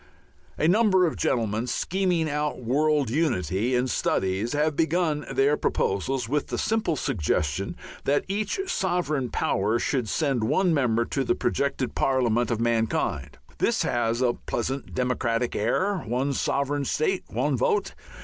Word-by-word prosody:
A 155 Hz, -, +2 dB
number 190 Hz, -1 st, +4 dB
of 160 Hz, -, -1 dB
gentlemen 115 Hz, -1 st, 0 dB
scheming 180 Hz, +1 st, 0 dB
out 150 Hz, -1 st, -2 dB
world 140 Hz, +1 st, +1 dB
unity 120 Hz, -, 0 dB
in 125 Hz, +1 st, +1 dB
studies 100 Hz, -1 st, 0 dB
have 150 Hz, +1 st, +1 dB
begun 160 Hz, -1 st, 0 dB
their 140 Hz, +2 st, +3 dB
proposals 115 Hz, +5 st, -1 dB
with 145 Hz, +4 st, -1 dB
the -, -, -3 dB
simple 220 Hz, -7 st, 0 dB
suggestion 75 Hz, -, -1 dB, 0.3 s
that 145 Hz, +1 st, +1 dB
each 205 Hz, -, -1 dB
sovereign 175 Hz, -, -1 dB
power 105 Hz, +1 st, 0 dB
should 125 Hz, -3 st, -1 dB
send 135 Hz, -7 st, 0 dB
one 175 Hz, -, +2 dB
member 120 Hz, -5 st, +2 dB
to 135 Hz, -, -1 dB
the -, -, +1 dB
projected 140 Hz, -2 st, -1 dB
parliament 120 Hz, -3 st, +1 dB
of 115 Hz, -, -1 dB
mankind. 115 Hz, -1 st, -1 dB, 0.2 s
This -, -, +2 dB
has 120 Hz, +1 st, 0 dB
a 120 Hz, -1 st, +3 dB
pleasant 130 Hz, +4 st, -4 dB
democratic 125 Hz, -2 st, 0 dB
air; 185 Hz, -, +1 dB
one 130 Hz, +2 st, -1 dB
sovereign 140 Hz, +1 st, 0 dB
state, 420 Hz, -, 0 dB
one -, -, 0 dB
vote. 455 Hz, -4 st, 0 dB
135 Hz, 140 wpm, -26 LUFS, 120-160 Hz, 0.3 s, number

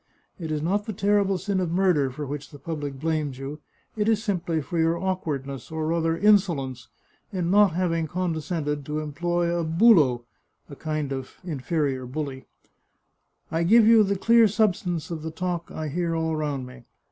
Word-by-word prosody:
It 160 Hz, -3 st, -4 dB
is 150 Hz, -1 st, -1 dB
not 205 Hz, +6 st, 0 dB
the 215 Hz, -, -3 dB
terrible 200 Hz, 0 st, +2 dB
sin 195 Hz, +1 st, -1 dB
of 180 Hz, -2 st, -1 dB
murder 175 Hz, -7 st, +2 dB
for 145 Hz, +4 st, -6 dB
which 145 Hz, +1 st, -6 dB
the 145 Hz, -, -12 dB
public 145 Hz, -2 st, -5 dB
blames 155 Hz, -3 st, -1 dB
you, 140 Hz, +3 st, -6 dB, 0.4 s
it 215 Hz, 0 st, +1 dB
is 220 Hz, -1 st, +2 dB
simply 175 Hz, -6 st, -1 dB
for 165 Hz, +3 st, -3 dB
your 165 Hz, +1 st, +2 dB
awkwardness, 145 Hz, -8 st, -3 dB
or 160 Hz, -1 st, -3 dB
rather 165 Hz, 0 st, 0 dB
insolence, 165 Hz, -, +2 dB, 0.4 s
in 180 Hz, -3 st, -1 dB
not 205 Hz, -3 st, +5 dB
having 165 Hz, -2 st, 0 dB
condescended 160 Hz, -4 st, -2 dB
to 150 Hz, +1 st, -2 dB
employ 170 Hz, +3 st, -1 dB
a 170 Hz, -, 0 dB
bulo 160 Hz, -, +4 dB, 0.4 s
[a 140 Hz, -, -10 dB
kind 155 Hz, -2 st, -3 dB
of 130 Hz, -1 st, -6 dB
in 160 Hz, -6 st, -4 dB
ferior 135 Hz, -4 st, -1 dB
bully]. 140 Hz, -2 st, -5 dB, 1.0 s
I 165 Hz, 0 st, 0 dB
give 215 Hz, +6 st, +6 dB
you 225 Hz, 0 st, +7 dB
the 200 Hz, 0 st, 0 dB
clear 230 Hz, +3 st, +5 dB
substance 180 Hz, -6 st, 0 dB
of 160 Hz, -2 st, -4 dB
the 160 Hz, -, -4 dB
talk 175 Hz, +1 st, -3 dB
I 155 Hz, -, -4 dB
hear 170 Hz, +2 st, -1 dB
all 160 Hz, -1 st, 0 dB
round 145 Hz, -4 st, -2 dB
me. 125 Hz, -1 st, -13 dB
165 Hz, 180 wpm, -25 LUFS, 145-185 Hz, 1.0 s, you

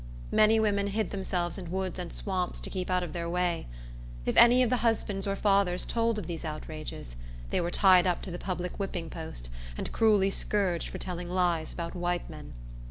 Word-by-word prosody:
Many 220 Hz, +1 st, +5 dB
women 200 Hz, -2 st, +2 dB
hid 210 Hz, 0 st, -1 dB
themselves 185 Hz, -2 st, -2 dB
in 175 Hz, -3 st, -7 dB
woods 190 Hz, 0 st, -2 dB
and 175 Hz, -2 st, -5 dB
swamps, 185 Hz, -3 st, -2 dB
to -, -, -5 dB
keep 185 Hz, -1 st, -3 dB
out 180 Hz, -1 st, +2 dB
of 175 Hz, -, -6 dB
their 170 Hz, -1 st, -3 dB
way. 175 Hz, -, 0 dB, 0.6 s
If -, -, 0 dB
any 240 Hz, +2 st, +7 dB
of 240 Hz, -, +1 dB
the 250 Hz, -, +3 dB
husbands 215 Hz, -4 st, 0 dB
or 195 Hz, -, 0 dB
fathers 195 Hz, -3 st, +2 dB
told 230 Hz, -1 st, +1 dB
of 210 Hz, -, -4 dB
these 165 Hz, -1 st, -5 dB
outrages, 155 Hz, -, -6 dB, 0.4 s
they -, -, +1 dB
were 170 Hz, -, -1 dB
tied 185 Hz, -1 st, +5 dB
up 180 Hz, -, 0 dB
to 190 Hz, -, -5 dB
the 175 Hz, -, -5 dB
public 180 Hz, 0 st, -4 dB
whipping 180 Hz, -4 st, -3 dB
post, -, -, -7 dB, 0.3 s
and -, -, -4 dB
cruelly 205 Hz, -3 st, +4 dB
scourged 190 Hz, -4 st, 0 dB
for -, -, -6 dB
telling 175 Hz, -1 st, -5 dB
lies 175 Hz, -3 st, +1 dB
about 170 Hz, -1 st, -5 dB
white 175 Hz, -1 st, -1 dB
men. -, -, -10 dB
185 Hz, 200 wpm, -29 LUFS, 175-200 Hz, 0.6 s, any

